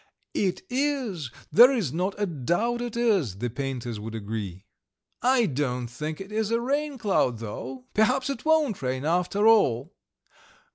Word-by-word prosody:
"It 185 -3 -1
is, 250 - -1 0.2
there 245 +4 +8
is 205 - -1
not 185 +4 -1
a 205 - +1
doubt 175 - -1
it 240 -1 -4
is," 195 - +1
the 120 +3 -3
painters 125 -4 -4
would 110 +1 -6
agree. 100 -3 -5 0.6
"I 250 -1 +4
don't 125 -5 -1
think 150 +6 -5
it 195 +1 -8
is 215 0 0
a 230 0 +2
rain 285 +3 -1
cloud, 195 - +1
though. 125 +4 -7
Perhaps 250 +4 +2
it 275 - -6
won't 310 - +2
rain 130 +1 -2
after 180 +6 +2
all." 170 - +4
180 Hz, 155 wpm, -26 LUFS, -, 0.6 s, there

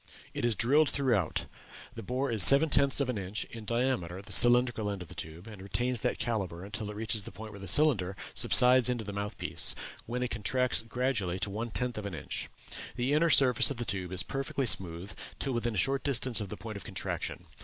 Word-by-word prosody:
It - - -5
is 120 -2 +1
drilled 140 +8 +3
throughout; 115 - -1 0.5
the - - -8
bore 130 +4 -3
is 110 -3 +2
seven 140 - +8
tenths 140 -1 +3
of 140 - 0
an 125 -5 -3
inch 100 +2 -4
in 115 -2 -9
diameter 115 -7 -2
at 100 - -11
the - - -12
cylindrical 120 -3 +5
end 100 -3 -5
of 85 - -16
the - - -11
tube, 80 +3 -9
and 105 -4 -11
retains 120 +5 -2
that 125 +2 -2
calibre 95 -7 -4
until 105 +1 -5
it 105 - -8
reaches 110 0 -1
the - - -9
point 110 0 -10
where 100 - -11
the 95 - -8
cylinder 100 - +3 0.2
subsides 125 0 +5
into 120 -2 -2
the 100 -1 -7
mouth 100 +2 -5
piece, - - +1 0.3
when 125 +2 -3
it 125 - -4
contracts 125 +4 -1
gradually 115 -6 -2
to 100 +2 -3
one 115 +4 -5
tenth 125 0 -3
of 100 - -6
an 95 - -7
inch. 75 - -7 0.5
The 125 +4 -1
inner 165 +3 +2
surface 130 -6 +5
of 140 - -5
the 120 - -4
tube 95 -3 -2
is 90 -2 +2
perfectly 135 +5 -3
smooth 90 -3 +1 0.2
till 135 - -3
within 120 -1 -2
a - - -3
short 135 +8 0
distance 130 -4 -1
of 100 - -6
the - - -7
point 110 -2 -8
of - - -10
contraction. 90 -3 -6
115 Hz, 230 wpm, -29 LUFS, 100-125 Hz, 0.5 s, seven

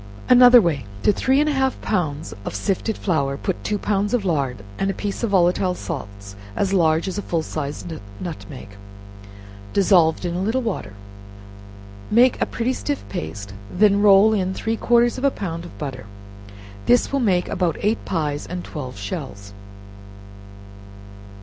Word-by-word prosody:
Another 245 0 +9
Way. 160 - 0 0.2
To - - +5
three 265 +6 +2
and 300 - +2
a - - +2
half 265 -1 0
pounds 160 -7 -2
of - - -5
sifted 205 +2 -1
flour, 140 -7 0
put 185 +4 -3
two 210 - -1
pounds 205 +2 0
of 220 -5 -2
lard, 135 - -1 0.2
and 195 - 0
a 195 - -2
piece 205 -2 -4
of 230 - 0
volatile 180 -1 +2
salts 100 - -7 0.2
(as 195 - 0
large 165 -2 +2
as 190 +2 -3
a - - -2
full 165 -4 -2
sized 155 +2 -5 0.3
nutmeg) 155 - -8 1.0
dissolved 180 -4 +3
in 175 - -2
a 180 - -2
little 230 +6 0
water; 140 - -4 1.2
make 245 +3 +4
a - - +2
pretty 240 +2 -1
stiff 290 +2 -4
paste; 100 - -6 0.2
then 205 +1 +3
roll 205 +1 +6
in 190 -2 -1
three 225 0 -2
quarters 240 +2 +2
of - - -8
a 280 - +5
pound 170 -8 -5
of - - -12
butter. 130 -7 -6 0.8
This 245 +2 +3
will 275 - +2
make 185 -7 +1
about 175 -4 -1
eight 215 +3 0
pies 150 -4 -2
and 180 0 -5
twelve 130 -5 -7
shells. 100 - -6
185 Hz, 160 wpm, -22 LUFS, 155-215 Hz, 1.2 s, Another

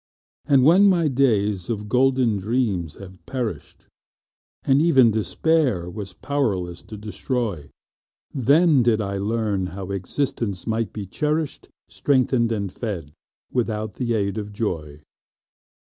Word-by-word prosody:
But 140 -2 +5
when 180 +9 +6
my 170 -4 +3
days 105 -9 +1
of 105 -2 -3
golden 125 -2 +2
dreams 100 - -1
had 95 -2 -12
perished, 125 -5 -5 0.8
And 135 +2 +3
even 135 -8 +5
Despair 105 - +1
was 100 0 -6
powerless 100 -12 -2
to 110 - -10
destroy, 105 - -3 0.6
Then 145 +3 +4
did 115 -2 +2
I 100 -2 -2
learn 105 -2 -1
how 95 0 -5
existence 100 0 -2
might 115 -2 -1
be 105 -2 -6
cherished, 150 - -2 0.2
Strengthened 130 -4 +1
and 100 -4 -2
fed 95 -12 -5 0.4
without 110 -4 -1
the 120 -2 0
aid 100 0 -1
of 105 0 -6
joy. 80 -8 -4
110 Hz, 125 wpm, -23 LUFS, 100-130 Hz, 0.8 s, when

